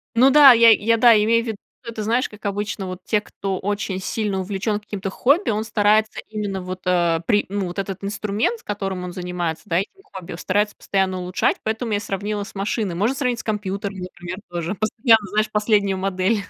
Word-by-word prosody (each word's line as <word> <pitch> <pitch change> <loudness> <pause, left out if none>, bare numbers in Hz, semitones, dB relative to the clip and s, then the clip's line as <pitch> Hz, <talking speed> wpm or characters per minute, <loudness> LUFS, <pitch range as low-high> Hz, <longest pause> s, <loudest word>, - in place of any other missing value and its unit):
Ну 260 +3 +6
да, 285 -3 +9
я 230 -1 +7
я, 225 +2 +3
да, 235 0 +7
имею 230 +1 +3
в - - -8
виду, 220 -2 -3 0.3
это, 225 -2 -4
знаешь, 235 +4 +1
как 210 0 -15
обычно, 200 -1 -3
вот 185 0 -6
те, 210 -2 +1
кто 195 -2 -4
очень 195 -1 -3
сильно 205 0 -2
увлечен 205 +2 -2
каким-то 205 -2 -5
хобби, 285 - +2
он 215 0 0
старается 215 0 +2
именно 205 -3 -4
вот, 185 0 -6
э, 170 -2 +2
при 205 +3 +2
ну, 195 -3 -2
этот 195 0 -5
инструмент, 210 - -1
с - - -21
которым 195 -3 -4
он 180 - -6
занимается, 175 -3 -4
да, 170 - +1
этим 215 - -6
хобби, 185 - -9
старается 205 +3 0
постоянно 190 -2 -1
улучшать, 180 +1 0
поэтому 220 0 -2
я 205 - +1
сравнила 205 +1 -3
с - - -11
машиной. 200 -2 -2
Можно 215 +9 +1
сравнить 250 -4 -1
с - - -7
компьютером, 200 -2 -3
например, 180 0 -7
тоже 175 +2 -3
постоянно, 220 +2 +3
знаешь, 215 +2 +1
последнюю 210 -2 +2
модель. 195 +2 0
205 Hz, 195 wpm, -22 LUFS, 190-220 Hz, 0.3 s, да